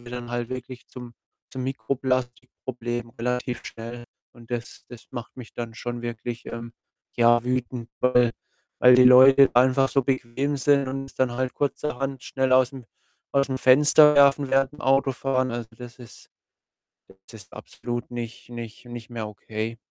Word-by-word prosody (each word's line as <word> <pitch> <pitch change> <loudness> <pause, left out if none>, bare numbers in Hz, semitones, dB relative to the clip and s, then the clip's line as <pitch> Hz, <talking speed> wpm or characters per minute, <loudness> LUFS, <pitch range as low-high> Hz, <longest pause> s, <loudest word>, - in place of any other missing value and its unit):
dann 120 -1 -7
halt 120 -1 -3
wirklich 125 -1 -8
zum 125 -2 -11 0.4
zum 130 - -4
Mikroplastik-Problem 125 -1 -3
relativ 125 0 -2
schnell. 120 +1 -8 0.3
Und 115 -1 -17
das 120 -1 -6
das 120 -2 -13
macht 120 -1 -8
mich 120 -3 -10
dann 115 -1 -6
schon 120 0 -6
wirklich, 120 0 -6
ähm, 115 0 -7 0.4
ja 120 0 +4
wütend, 125 -1 -3
weil 125 -2 +3 0.5
weil 125 0 +7
die 125 - +6
Leute 135 +2 +8
einfach 130 +2 +4
so 135 - +2
bequem 135 +2 -1
sind 140 0 +2
und 135 +1 -4
es 135 - -16
dann 130 -2 +1
halt 130 +1 -2
kurzerhand 135 -2 -3
schnell 130 -1 -1
aus'm 130 0 +2 0.5
aus'm 140 -1 +1
Fenster 150 +3 +6
werfen 140 -1 +4
während 135 0 +2
dem 150 - -12
Autofahren. 135 -1 +1
Also, 120 -1 -5
das 125 0 -11
ist 120 -2 -14 1.0
das 110 - -12
ist - - -24
absolut 120 0 -6
nicht 120 -1 -7
nicht 120 -1 -9
nicht 120 -2 -9
mehr 115 -2 -5
okay. 110 +2 -6
125 Hz, 155 wpm, -24 LUFS, 120-130 Hz, 1.0 s, Leute